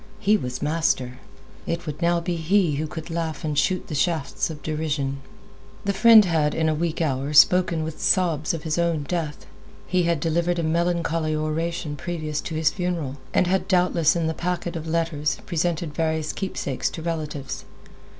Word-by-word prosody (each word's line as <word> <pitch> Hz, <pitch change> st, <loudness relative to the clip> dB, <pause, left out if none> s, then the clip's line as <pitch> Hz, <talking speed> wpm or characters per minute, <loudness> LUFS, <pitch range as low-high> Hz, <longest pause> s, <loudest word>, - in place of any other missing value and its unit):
He 210 Hz, +2 st, +3 dB
was 125 Hz, -9 st, -3 dB
master. 145 Hz, -5 st, 0 dB, 0.5 s
It 170 Hz, +1 st, -2 dB
would 150 Hz, +1 st, -6 dB
now 170 Hz, 0 st, +3 dB
be 175 Hz, +1 st, -2 dB
he 165 Hz, -2 st, +2 dB
who 155 Hz, +1 st, -2 dB
could 160 Hz, +2 st, -7 dB
laugh 165 Hz, -1 st, -3 dB
and 150 Hz, -2 st, -1 dB
shoot 185 Hz, +5 st, +1 dB
the -, -, -6 dB
shafts 155 Hz, 0 st, 0 dB
of 150 Hz, -2 st, -8 dB
derision. 150 Hz, -3 st, -2 dB, 0.6 s
The 200 Hz, -, +1 dB
friend 220 Hz, +1 st, +8 dB
had, 155 Hz, -4 st, +1 dB
in 160 Hz, 0 st, +1 dB
a 155 Hz, -, +2 dB
weak 165 Hz, +1 st, -1 dB
hour, 140 Hz, 0 st, -1 dB
spoken 170 Hz, +1 st, +5 dB
with 160 Hz, 0 st, -6 dB
sobs 165 Hz, -5 st, +2 dB
of 165 Hz, -3 st, -4 dB
his 160 Hz, +1 st, -1 dB
own 170 Hz, -3 st, +1 dB
death. 155 Hz, -1 st, -3 dB, 0.4 s
He 185 Hz, 0 st, +1 dB
had 170 Hz, -2 st, +1 dB
delivered 170 Hz, +3 st, 0 dB
a 170 Hz, -, -1 dB
melancholy 165 Hz, -1 st, 0 dB
oration 155 Hz, +1 st, -2 dB
previous 155 Hz, -1 st, -3 dB
to 160 Hz, -, -5 dB
his 155 Hz, -1 st, +2 dB
funeral, 170 Hz, -7 st, -3 dB
and -, -, +3 dB
had 190 Hz, +2 st, 0 dB
doubtless 175 Hz, -4 st, +3 dB
in 170 Hz, -1 st, 0 dB
the 160 Hz, -, 0 dB
packet 175 Hz, 0 st, -3 dB
of 165 Hz, -1 st, -5 dB
letters, 155 Hz, -4 st, 0 dB
presented 170 Hz, -2 st, -1 dB
various 160 Hz, -1 st, -1 dB
keepsakes 165 Hz, -8 st, -2 dB
to 160 Hz, -, -8 dB
relatives. 150 Hz, -5 st, -4 dB
160 Hz, 180 wpm, -24 LUFS, 150-170 Hz, 0.6 s, friend